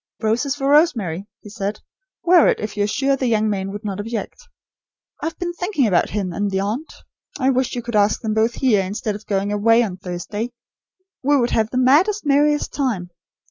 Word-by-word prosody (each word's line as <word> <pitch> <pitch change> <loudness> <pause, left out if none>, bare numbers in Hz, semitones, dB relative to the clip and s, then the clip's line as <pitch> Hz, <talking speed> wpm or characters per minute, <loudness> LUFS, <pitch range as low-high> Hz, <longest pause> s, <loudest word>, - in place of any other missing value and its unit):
"Roses 240 +6 0
for 275 -1 -2
Rosemary," 230 - +2
he 210 - -11
said. 205 0 -4 0.4
"Wear 345 -2 +6
it, - - +2
if 210 -1 -5
you 205 -1 +1
are - - -1
sure 275 +5 +1
the 260 -1 -1
young 220 -2 +2
man 195 -2 -2
would 205 +2 -7
not 200 -1 -3
object. 230 - -5 0.7
I - - -1
have 325 - -6
been 345 -1 -3
thinking 355 - 0
about 185 -5 +2
him 195 -4 -3
and 205 +2 -1
the 190 -1 -1
aunt. 220 +11 -3 0.5
I 265 -1 +2
wish 255 -1 0
you 240 - -4
could 235 -1 -4
ask 205 0 +3
them 220 -2 -2
both 225 +2 +1
here, 220 -8 +2
instead 205 +3 -3
of 210 +1 -10
going 200 0 0
away 225 +3 +4
on 190 -5 -4
Thursday. 190 +6 -5 0.7
We 285 +2 +3
would 240 -2 +1
have 220 -1 +1
the 250 - -3
'maddest, 320 +11 +3
merriest 295 +1 +2
time!' 220 -11 -2
225 Hz, 210 wpm, -21 LUFS, 205-275 Hz, 0.7 s, Wear